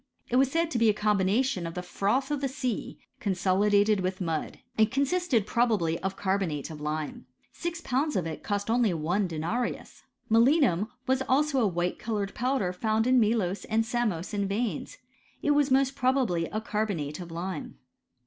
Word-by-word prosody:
It 245 - +2
wa* 270 - +6
said 330 +5 0
to 240 - 0
be 230 -1 +5
a 210 - +2
combination 210 0 +1
of 165 - -7
the 180 - -4
froth 245 +10 0
of 290 -2 -1
the 275 - +1
sea 255 -4 -3 0.2
con 200 -5 0
solidated 205 +3 +3
with 185 0 -2
mud. 165 -4 -2 0.2
It 220 -1 +4
consisted 275 - +1
probably 210 -9 +1
of 190 0 -3
car 195 0 0
bonate 155 -5 -3
of 150 -1 -9
lime. 150 -3 -4 0.2
Six 340 0 -4
pounds 285 +3 0
of 180 - 0
it 160 - -5
cost 205 +1 -2
only 230 -6 +2
one 175 +6 0
denarius. 175 +10 -3 0.3
Melinum 230 - +4 0.2
was 260 0 +1
also 280 +1 +3
a 220 - +3
white 175 -1 -1
coloured 210 -3 -2
powder 245 -7 0
found 220 +4 0
In 255 0 +5
Melos 210 -4 +1
and 225 +1 +1
Samos 220 -8 -1
in 200 -1 -1
yeins. 235 +5 -2 0.5
It 295 - +3
was 290 -1 +3
most 270 0 +3
probably 250 -11 +1
a 215 - -3
carbonate 195 -10 -2
of 175 -1 -7
lime. 170 -1 -5
215 Hz, 180 wpm, -28 LUFS, 185-255 Hz, 0.5 s, wa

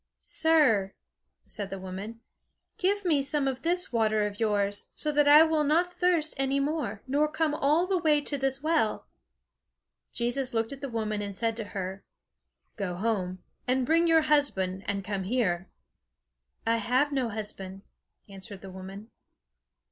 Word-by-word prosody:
"Sir," 265 - +3 0.5
said 205 -3 -5
the 195 - -5
woman, 195 +5 -7 0.6
"give 400 +1 0
me 305 -5 +3
some 280 0 +1
of 265 -1 -2
this 355 -2 0
water 215 -2 +2
of 205 0 -5
yours, 205 -2 0
so 305 - +1
that 295 0 +3
I 300 +2 +9
will 315 -1 +2
not 340 +5 +2
thirst 355 -3 +1
any 270 +1 +1
more, 275 -8 -2
nor 285 +3 +2
come 315 -1 0
all 300 +3 +2
the 375 -1 0
way 310 -3 +3
to 290 - -3
this 270 0 -1
well." 310 -9 +1 1.1
Jesus 245 +1 -1
looked 225 0 0
at 275 - -10
the 280 - -4
woman, 215 -3 -2
and 200 -1 -5
said 225 +2 -1
to 225 - -4
her, 195 -1 -5 0.7
"Go 190 -4 -3
home, 185 -3 -2 0.2
and 255 0 +1
bring 330 +4 +3
your 325 -1 +5
husband, 240 -12 +1
and 200 -1 -2
come 200 -1 -2
here." 190 -5 0 1.0
"I 230 +1 +2
have 255 +6 +1
no 265 -4 0
husband," 195 -3 -6 0.4
answered 195 0 -10
the 195 - -9
woman. 195 +4 -10
240 Hz, 160 wpm, -28 LUFS, 200-300 Hz, 1.1 s, I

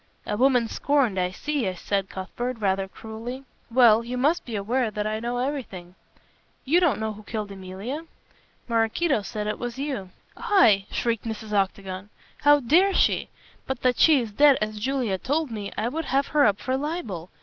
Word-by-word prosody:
"A 210 - -2
woman 250 0 +3
scorned, 260 -7 +1
I 180 0 +1
see," 255 +1 -2
said 195 +2 -2
Cuthbert, 240 +6 -4
rather 195 -2 0
cruelly, 225 +6 -8 0.3
"well, 230 -2 +5
you 245 +2 -4
must 295 +7 +2
be 235 - -5
aware 230 +4 0
that 210 0 -3
I 215 0 -1
know 240 +2 -3
everything." 240 -10 -4 0.7
"You 320 +6 +4
don't 305 - +2
know 220 0 -2
who 215 - -12
killed 215 -1 -5
Emilia?" 195 - -6 0.6
"Maraquito 230 +4 +1
said 210 +1 -5
it 210 0 -3
was 245 +1 -5
you." 265 -9 -4 0.3
"I" 355 - +4
shrieked 230 -2 -1
Mrs. 220 -1 -5
Octagon, 195 -1 -2 0.3
"how 290 0 +5
dare 360 +10 +4
she? - - +2 0.4
But 265 -1 -4
that 250 -1 +2
she 310 -4 +6
is 230 -3 -4
dead, 285 +5 +5
as 215 0 -3
Juliet 240 -5 -1
told 295 0 0
me, 205 -3 -5
I 220 - 0
would 315 +6 -3
have 275 +2 +1
her 295 -4 +4
up 200 -1 +2
for 260 +4 -2
libel. 265 - -4
230 Hz, 180 wpm, -25 LUFS, 205-275 Hz, 0.7 s, she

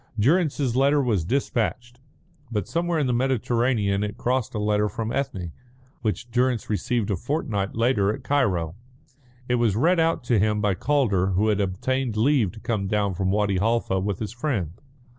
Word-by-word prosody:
Durrance's 140 - +2
letter 140 +3 +4
was 105 -9 +1
despatched, 120 - -2 0.5
but 105 -5 -2
somewhere 170 0 -1
in 150 - +1
the 125 - 0
Mediterranean 120 -5 +1
it 105 -1 -4
crossed 125 -2 -1
a - - -1
letter 105 0 +1
from 115 -1 -4
Ethne, 95 -12 -3 0.5
which 115 +2 -3
Durrance 125 -2 0
received 105 +2 -1
a - - +1
fortnight 105 - -2
later 115 -4 +2
at - - -6
Cairo. 95 - +1 0.7
It 125 - +2
was 110 -5 +2
read 170 +10 +3
out 165 -4 +1
to 120 -3 +2
him 105 +1 +1
by 105 -2 +1
Calder, 100 -6 +1
who 105 +4 +2
had 105 -1 +1
obtained 115 +5 -1
leave 120 -4 +3
to 110 - -11
come 110 -4 -2
down 100 -1 0
from 95 +1 -1
Wadi 100 -1 +1
Halfa 110 -2 +1
with 100 0 -2
his 110 - -5
friend. 120 - -2
115 Hz, 175 wpm, -24 LUFS, 100-130 Hz, 0.7 s, letter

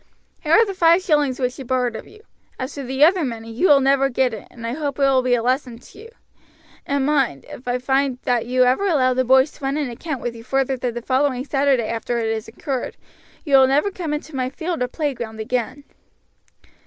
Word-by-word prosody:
"Here 310 0 -1
are 455 +5 +6
the 395 - -4
five 340 0 +4
shillings 295 -7 +1
which 250 -1 -2
he - - -8
borrowed 250 -2 -1
of - - -8
you; 425 +1 -17 0.4
as 260 +2 -5
to 285 - -6
the 265 +2 0
other 355 +1 +3
money, 230 -4 -5
you 250 +12 +1
will 280 -4 +6
never 275 0 +3
get 255 -1 +1
it, 220 - -8
and 230 -1 -10
I 230 - -2
hope 285 -2 -3
it 280 - 0
will 270 -1 +4
be 250 -1 +2
a 230 - -2
lesson 250 -1 -1
to 250 - -17
you; 450 +2 -12 0.8
and 280 -1 0
mind, 270 - 0
if 250 - -11
I 245 0 0
find 265 0 0
that 240 -3 0
you 255 +1 +3
ever 255 +11 +2
allow 260 -8 +2
the 255 +1 +1
boys 265 +3 +4
to - - -18
run 270 +2 -1
an 285 -5 -2
account 270 +2 -5
with 240 -1 -3
you 225 - -11
further 270 +1 0
than 245 -2 -4
the 240 - -5
following 260 0 0
Saturday 275 -5 +1
after 230 +1 -3
it 225 -1 -1
is 220 - -6
incurred, 250 +3 -5 0.5
you 280 -3 +3
will 265 -1 +6
never 290 +9 +2
come 345 -5 -5
into 300 0 -5
my 255 -1 -1
field 330 0 -4
or 250 - +1
playground 245 -6 -4
again." 250 +5 -3
265 Hz, 235 wpm, -21 LUFS, 245-290 Hz, 0.8 s, are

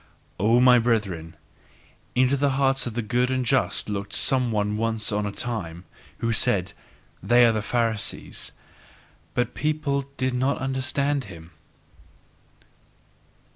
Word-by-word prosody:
O 115 +5 +4
my 125 -1 +6
brethren, 100 -9 -1 0.8
into 130 +2 +3
the 140 0 +1
hearts 135 -2 +2
of 115 - -6
the 120 - -1
good 125 +3 +1
and 130 -1 -1
just 100 -3 0
looked 100 -1 -4
some 130 -4 +2
one 105 -1 0
once 110 -1 -1
on 105 0 -1
a - - -3
time, 95 -8 -4 0.3
who 115 0 -1
said: 95 -4 +1 0.5
"They 120 0 +5
are 115 - +5
the 110 -1 -1
Pharisees." 115 -1 -2 0.8
But 120 -1 0
people 145 -2 -1
did 130 0 0
not 130 +3 0
understand 135 +1 -1
him. 85 -4 -12
120 Hz, 135 wpm, -24 LUFS, 105-130 Hz, 0.8 s, my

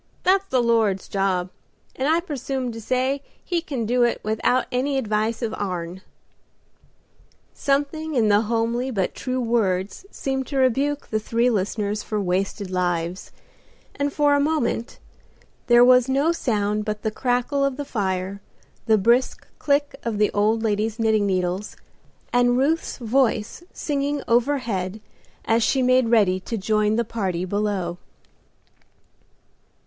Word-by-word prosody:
That's 385 +2 +3
the 255 -8 +1
Lord's 220 -5 +1
job, 190 -2 -1 0.4
and 265 - -1
I 325 +2 +3
presume 270 -5 -3
to 225 0 -8
say 260 +4 0 0.2
He 345 -2 0
can 270 -8 -3
do 245 +3 +1
it 240 -1 +2
without 220 +4 +1
any 270 +3 0
advice 220 -1 -1
of 225 - -2
ourn." 180 -2 -4 1.5
Something 290 +2 -1
in 230 -4 +3
the 205 0 +4
homely 230 +3 -1
but 195 -7 -1
true 255 0 -3
words 220 - -1
seemed 265 -6 -3
to 280 - -3
rebuke 275 +3 +1
the 215 - +1
three 235 +3 +1
listeners 205 0 -1
for 215 0 -3
wasted 195 +1 -2
lives, 175 -1 -2 0.6
and 285 0 -1
for 290 0 +3
a 285 - +3
moment 285 -6 -1 0.7
there 240 0 +7
was 250 0 +5
no 280 +5 +2
sound 210 -9 -1
but 210 0 -4
the 220 - 0
crackle 250 +4 0
of 275 -1 0
the 290 - -4
fire, 195 -3 -2 0.5
the 220 -1 +5
brisk 235 +6 +2
click 285 -1 +1
of 230 -3 -3
the 210 0 +2
old 215 +2 +1
lady's 215 0 0
knitting 220 -3 +2
needles, 185 +1 -1 0.6
and 245 0 +3
Ruth's 310 +5 0
voice 235 0 0
singing 285 -1 -2
overhead 230 -6 0 0.5
as 225 +1 +2
she 260 +3 +2
made 255 -1 +3
ready 200 -5 +3
to 225 +4 -5
join 215 +1 +1
the 235 +1 0
party 190 -6 -2
below. 190 -3 -2
230 Hz, 145 wpm, -23 LUFS, 205-265 Hz, 1.5 s, there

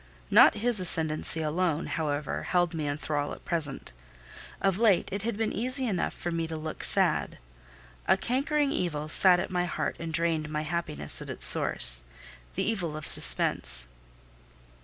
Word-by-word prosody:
Not - - +6
his 235 -1 0
ascendancy 160 -2 +2
alone, 165 0 -2
however, 150 -2 -4
held 175 -1 -1
me 155 -2 -4
in 145 0 -3
thrall 145 -1 -4
at - - -13
present. 150 - -4 0.7
Of 195 0 -1
late 215 -6 +2
it 200 +1 -4
had 225 0 -4
been 220 -1 -2
easy 255 +4 -1
enough 195 -7 -3
for 175 - -6
me 165 -1 -3
to 160 0 -6
look 155 0 -7
sad: - - 0 0.7
a - - +3
cankering 280 +3 -1
evil 155 -4 -4
sat 180 +2 +5
at 185 - -5
my 180 -1 -1
heart 170 - -4
and 165 -1 -6
drained 160 -2 -1
my 150 0 -4
happiness 150 - -2
at - - -10
its - - -2
source—the - - +1
evil 180 -8 -3
of 155 - -8
suspense. - - +4
165 Hz, 160 wpm, -27 LUFS, 150-190 Hz, 0.7 s, Not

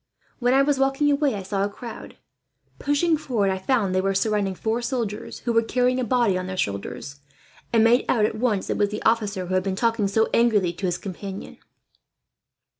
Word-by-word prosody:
"When 245 +1 +2
I 275 - +5
was 280 -1 +1
walking 270 +2 +2
away, 280 -4 +1
I 195 - -5
saw 195 +1 -1
a 200 - 0
crowd. 230 +3 -10 0.6
Pushing 310 +3 +2
forward, 230 -10 0
I 190 - -2
found 205 -3 +1
they 185 - +2
were 195 0 0
surrounding 200 -1 0
four 225 +5 -1
soldiers 235 -5 -4
who 235 - -1
were 230 - +4
carrying 250 +2 +1
a - - 0
body 235 -5 +2
on 185 - -5
their 190 0 -5
shoulders, 105 - -4 0.5
and 225 -2 +4
made 235 +3 +4
out 220 -4 +3
at - - -1
once 215 -3 0
it - - -1
was 205 -1 +2
the 210 - -5
officer 210 -5 +1
who 185 - -4
had 185 - +3
been 190 0 -2
talking 225 -1 +1
so 220 +3 +2
angrily 210 -7 +3
to 185 +3 -3
his 175 0 -1
companion. 195 +1 -8
215 Hz, 205 wpm, -24 LUFS, 195-245 Hz, 0.6 s, I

